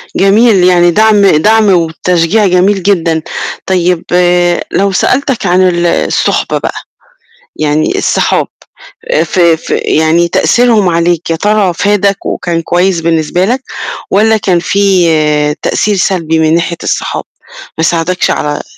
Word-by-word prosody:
جميل، 200 0 +3
يعني 175 -1 +3
دَعم 215 0 +3
دَعم 210 +5 +3
وتشجيع 175 +3 +1
جميل 185 +1 +1
جدًا، 165 -5 0 0.4
طيب، 180 -2 0 0.7
لو 200 0 0
سألتك 255 +4 -1
عن 180 +1 +2
ال 175 -1 -1
الصُحبة 170 - 0
بقى، - - -4 0.8
يعني 155 0 -1
الصحاب - - 0 0.7
آآ، - - +2
في 170 -3 +1
في - - -4
يعني 160 +2 +1
تأثيرهم 225 0 +2
عليك، 170 0 -1
يا 165 - 0
ترى 205 0 0
فادَك 200 +1 0
وكان 170 -2 -3
كويس 175 +1 0
بالنسبة 165 +2 0
لك، 250 +5 -1 0.5
والَّا 220 +2 +3
كان 185 -4 0
في 160 -6 +1
تأثير 210 -1 0
سلبي 165 -4 -1
من 160 +1 +2
ناحية 170 0 -2
الصحاب، - - -3 0.6
ما 160 - 0
ساعدكش 170 +2 0
على 150 0 -2
180 Hz, 130 wpm, -10 LUFS, 165-200 Hz, 0.8 s, جميل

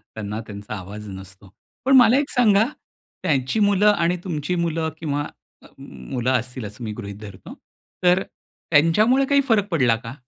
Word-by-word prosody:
त्यांना 105 0 -5
त्यांचा 105 0 -8
आवाज 105 +2 -8
नसतो. 95 0 -12 0.3
पण 270 +1 +5
मला 245 0 +6
एक 285 0 0
सांगा 220 -4 +4 0.6
त्यांची 145 - 0
मुलं 205 0 +4
आणि 175 -2 0
तुमची 170 -1 -3
मुलं 165 -2 -1
किंवा 145 -3 -2 0.6
मुलं 120 - -4
असतील 125 -1 -2
असं 105 +4 -9
मी 110 - -4
गृहीत 100 -3 -7
धरतो 100 -3 -10 0.5
तर 180 +1 +5
अ, - - -3 0.5
त्यांच्यामुळे 210 - +4
काही 280 +1 +3
फरक 205 -3 +3
पडला 130 -9 +3
का? 115 +1 -8
150 Hz, 160 wpm, -22 LUFS, -, 0.6 s, मला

